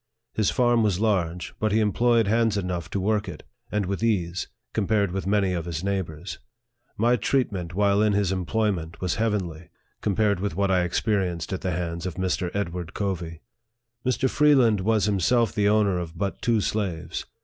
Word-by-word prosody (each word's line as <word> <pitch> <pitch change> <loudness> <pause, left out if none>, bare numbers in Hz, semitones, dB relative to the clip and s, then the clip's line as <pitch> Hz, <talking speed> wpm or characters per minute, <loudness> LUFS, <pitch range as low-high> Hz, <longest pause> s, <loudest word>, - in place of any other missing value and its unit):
His 110 -3 +1
farm 120 -2 +3
was 100 -4 +1
large, 90 -6 0
but 110 -1 +1
he 110 - +3
employed 115 +2 +3
hands 110 0 +2
enough 90 -3 -3
to 100 - -2
work 105 +2 0
it, - - -9 0.3
and 105 -2 0
with 100 +3 -3
ease, 90 -6 0 0.3
compared 100 -2 +1
with 95 0 -3
many 100 -2 +2
of 85 -2 -3
his 85 -1 -4
neighbors. 95 -3 -3 0.6
My 120 +3 +3
treatment, 100 -7 -1
while 100 0 +3
in 105 -1 +3
his 100 -2 +1
employment, 95 -3 -1
was 90 -2 -1
heavenly, 95 -7 -2 0.3
compared 105 -1 +1
with 100 -3 -2
what 100 0 +1
I 90 -1 +3
experienced 90 -3 -1
at 95 - -3
the 95 - -1
hands 85 0 -3
of 90 - -5
Mr. 90 -1 -1
Edward 90 -2 -3
Covey. 85 -5 -3 0.6
Mr. 130 +1 +1
Freeland 130 -7 +4
was 105 +2 +2
himself 105 +3 +2
the 105 -1 +2
owner 105 -4 +3
of 85 -1 -6
but 100 +1 -3
two 115 -3 +2
slaves. 90 -6 -3
100 Hz, 175 wpm, -25 LUFS, 90-110 Hz, 0.6 s, Freeland